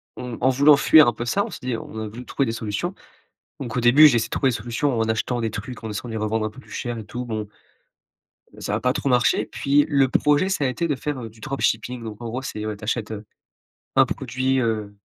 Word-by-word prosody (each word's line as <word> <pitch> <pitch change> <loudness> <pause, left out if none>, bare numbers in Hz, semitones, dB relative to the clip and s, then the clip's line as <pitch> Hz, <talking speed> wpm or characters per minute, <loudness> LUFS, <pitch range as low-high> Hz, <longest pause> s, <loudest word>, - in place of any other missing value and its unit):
en 125 -2 -6
en 130 - +4
voulant 140 +3 +6
fuir 155 0 +7
un 120 - +2
peu 120 +2 -5
ça, 200 +12 +1
on - - -8
s'est - - -8
dit 125 -2 -2
on 110 - -8
a 110 - -4
voulu 120 +4 -9
trouver 140 - 0
des - - 0
solutions. 115 - -3 0.6
Donc 120 -5 -5
au 125 - 0
début, 130 +6 +8
j'ai 135 - +3
essayé 115 - +1
de - - -32
trouver 135 - +2
des 120 - -1
solutions 120 +4 -1
en 115 - +2
achetant 120 +2 -1
des 115 -1 -1
trucs, 115 +3 -7
en 110 - -4
essayant 110 +3 -5
de - - -6
les - - -2
revendre 110 +1 -1
un - - -2
peu 125 +5 -14
plus - - -19
cher 120 -2 -4
et 110 - -7
tout. 125 +4 -6
Bon, 110 -3 -4 1.1
ça 105 - -2
a - - -1
pas 125 - +2
trop 140 - -2
marché. 125 -1 +3
Puis, 145 +1 +2
le 140 -3 +3
projet, 150 +7 +2
ça 185 -7 0
a - - +3
été 170 +7 -1
de 145 - +1
faire, 145 +2 -4
heu, 115 - -6
du 110 +1 -19
dropshipping. 125 -1 -2
Donc 110 -1 -8
en 120 - -5
gros, 120 +3 -4
c'est, 110 -5 -5
ouais, 110 -1 -3
tu 105 - -16
achètes, 110 0 -2
heu, 105 0 -6 0.7
un - - +7
produit, 130 0 -1
heu, 110 -4 -2
120 Hz, 270 wpm, -23 LUFS, 110-135 Hz, 1.1 s, début